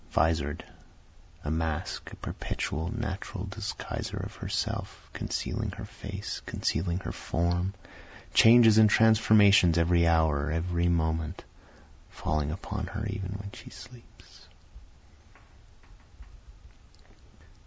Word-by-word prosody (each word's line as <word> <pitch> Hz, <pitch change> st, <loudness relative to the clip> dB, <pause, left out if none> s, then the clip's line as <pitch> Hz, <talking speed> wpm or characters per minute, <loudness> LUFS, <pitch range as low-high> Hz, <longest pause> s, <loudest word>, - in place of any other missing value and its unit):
Visor'd 80 Hz, -1 st, 0 dB, 0.8 s
A 75 Hz, -, -1 dB
mask, 80 Hz, -1 st, -3 dB
a -, -, -9 dB
perpetual 80 Hz, +3 st, -4 dB
natural 100 Hz, -3 st, -4 dB
disguiser 100 Hz, +1 st, -5 dB
of -, -, -9 dB
herself, -, -, -4 dB
Concealing -, -, -3 dB
her -, -, -7 dB
face, -, -, -7 dB
concealing 85 Hz, +2 st, -1 dB
her 90 Hz, -, -5 dB
form, 90 Hz, +3 st, -1 dB, 0.6 s
Changes 115 Hz, -1 st, +7 dB
and 110 Hz, -1 st, +7 dB
transformations 105 Hz, -5 st, +5 dB
every 85 Hz, 0 st, +3 dB
hour, 80 Hz, -2 st, +2 dB
every 85 Hz, +2 st, 0 dB
moment, 80 Hz, -1 st, -1 dB, 0.7 s
Falling 75 Hz, -2 st, -2 dB
upon 95 Hz, +2 st, -5 dB
her 105 Hz, +3 st, -5 dB
even 100 Hz, -3 st, -4 dB
when 100 Hz, 0 st, -7 dB
she -, -, -12 dB
sleeps. 125 Hz, -2 st, -15 dB
90 Hz, 100 wpm, -28 LUFS, 80-105 Hz, 0.8 s, Changes